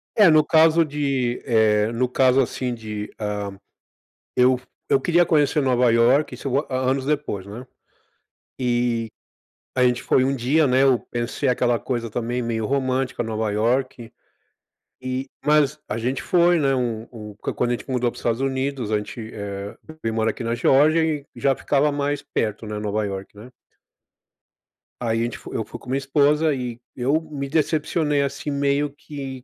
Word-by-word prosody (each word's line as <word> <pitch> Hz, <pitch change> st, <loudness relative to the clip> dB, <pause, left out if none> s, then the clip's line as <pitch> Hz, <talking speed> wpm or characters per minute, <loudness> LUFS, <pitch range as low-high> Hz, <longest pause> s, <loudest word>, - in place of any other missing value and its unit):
É, 210 Hz, -5 st, +7 dB
no 155 Hz, -1 st, +6 dB
caso 160 Hz, +1 st, +5 dB
de, 140 Hz, -5 st, -1 dB
eh, 110 Hz, -3 st, +3 dB
no 125 Hz, +2 st, +1 dB
caso 130 Hz, +1 st, +4 dB
assim 125 Hz, 0 st, -2 dB
de, 105 Hz, -2 st, -6 dB
hã, 105 Hz, -2 st, -4 dB, 0.8 s
eu 125 Hz, 0 st, +4 dB
fu 130 Hz, -, -22 dB, 0.2 s
eu 135 Hz, -, +3 dB
queria 175 Hz, +4 st, +3 dB
conhecer 150 Hz, -2 st, +2 dB
Nova 125 Hz, -2 st, +3 dB
Iorque, 120 Hz, +6 st, +3 dB
se -, -, -9 dB, 0.2 s
anos 130 Hz, +1 st, 0 dB
depois, 145 Hz, -10 st, -2 dB
né. 115 Hz, +6 st, -9 dB, 0.9 s
E 120 Hz, -2 st, 0 dB, 0.7 s
a 125 Hz, -, +4 dB
gente 125 Hz, -1 st, +2 dB
foi 130 Hz, -, +3 dB
um 135 Hz, +1 st, +1 dB
dia, 135 Hz, +6 st, +2 dB
né. 130 Hz, 0 st, +3 dB
Eu 135 Hz, -2 st, +5 dB
pensei 120 Hz, +4 st, -2 dB
aquela 125 Hz, -1 st, +2 dB
coisa 115 Hz, +1 st, -3 dB
também 120 Hz, +2 st, -2 dB
meio 115 Hz, -2 st, -2 dB
romântica, 130 Hz, 0 st, -1 dB
Nova 110 Hz, -2 st, -2 dB
Iorque. 120 Hz, +2 st, -1 dB, 0.9 s
E 130 Hz, +1 st, -4 dB, 0.2 s
mas 150 Hz, -1 st, +3 dB
a -, -, -3 dB
gente 125 Hz, +2 st, -2 dB
foi, 175 Hz, -1 st, +4 dB
né. 135 Hz, -2 st, +2 dB
Um 120 Hz, -3 st, -2 dB
um 105 Hz, -3 st, -9 dB, 0.2 s
quando 120 Hz, -, 0 dB
a -, -, +1 dB
gente 120 Hz, -, -6 dB
mudou 125 Hz, -2 st, +1 dB
para -, -, -12 dB
os -, -, -9 dB
Estados 115 Hz, +2 st, 0 dB
Unidos, 135 Hz, -3 st, -2 dB
a 105 Hz, -, +3 dB
gente, 110 Hz, +2 st, -7 dB
eh, 100 Hz, -2 st, -6 dB, 0.5 s
veio 115 Hz, 0 st, -1 dB
mora 110 Hz, 0 st, +1 dB
aqui 125 Hz, -, -6 dB
na 115 Hz, 0 st, 0 dB
Geórgia 150 Hz, +7 st, +4 dB
e 155 Hz, -3 st, -1 dB
já 135 Hz, -1 st, +1 dB
ficava 145 Hz, +1 st, +1 dB
mais 145 Hz, 0 st, -2 dB
perto, 110 Hz, 0 st, -3 dB
né, 105 Hz, 0 st, -4 dB
Nova 105 Hz, 0 st, -1 dB
Iorque, 95 Hz, 0 st, -6 dB
né? 105 Hz, +4 st, -12 dB, 1.5 s
Aí 115 Hz, -2 st, 0 dB
a -, -, +1 dB
gente 120 Hz, 0 st, -3 dB
foi -, -, -10 dB
eu -, -, -1 dB
fui -, -, -9 dB
com -, -, -13 dB
minha 130 Hz, -, +1 dB
esposa 145 Hz, +3 st, +2 dB
e 125 Hz, -3 st, -4 dB, 0.2 s
eu 135 Hz, +5 st, +1 dB
me 145 Hz, -4 st, -6 dB
decepcionei, 155 Hz, -1 st, +1 dB
assim, 140 Hz, +1 st, -3 dB
meio 140 Hz, +1 st, +1 dB
que 140 Hz, -3 st, -8 dB
130 Hz, 175 wpm, -23 LUFS, 115-140 Hz, 1.5 s, É